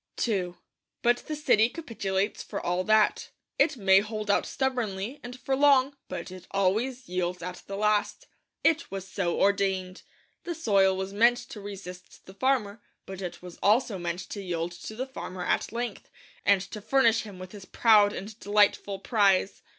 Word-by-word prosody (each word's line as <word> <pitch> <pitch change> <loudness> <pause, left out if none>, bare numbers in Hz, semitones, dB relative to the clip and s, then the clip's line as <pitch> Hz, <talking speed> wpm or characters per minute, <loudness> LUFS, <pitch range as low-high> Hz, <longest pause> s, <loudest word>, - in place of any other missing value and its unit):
II 185 -5 -1 0.5
But 240 0 +4
the 310 - -3
city 230 -7 +3
capitulates 205 - -3
for - - -5
all 180 +1 -1
that. 215 -1 +3 0.3
It 275 -1 +3
may 190 -3 +5
hold 210 0 -2
out - - +1
stubbornly, 245 -2 -2
and 245 +1 -9
for 270 - -1
long, 280 -1 +4
but 180 0 -6
it 185 -1 -11
always 225 +7 0
yields 180 -1 -2
at 180 0 -6
the 195 - -5
last. 210 - 0 0.4
It 325 0 +2
was 195 -1 -6
so 185 -2 -2
ordained. 195 -2 +1 0.4
The 345 - -4
soil 195 - +3
was 190 +1 -4
meant 235 +4 +4
to 210 - -8
resist 190 -3 -10
the 190 - -12
farmer; 220 -3 0 0.2
but 190 0 -8
it 180 -1 -6
was 180 -1 -10
also 210 -1 +2
meant 175 +1 -4
to 205 - -5
yield 175 -2 -3
to 175 +5 -9
the 255 +3 -3
farmer 185 -9 -7
at - - 0
length, 235 -2 -5 0.4
and 200 -2 +5
to 210 +2 -8
furnish 230 0 +3
him 205 -4 -10
with 185 0 -9
his 205 -3 -10
proud 210 -2 +5
and 210 +2 -8
delightful 205 -1 +2
prize. 195 -2 +2
205 Hz, 175 wpm, -27 LUFS, 190-235 Hz, 0.5 s, may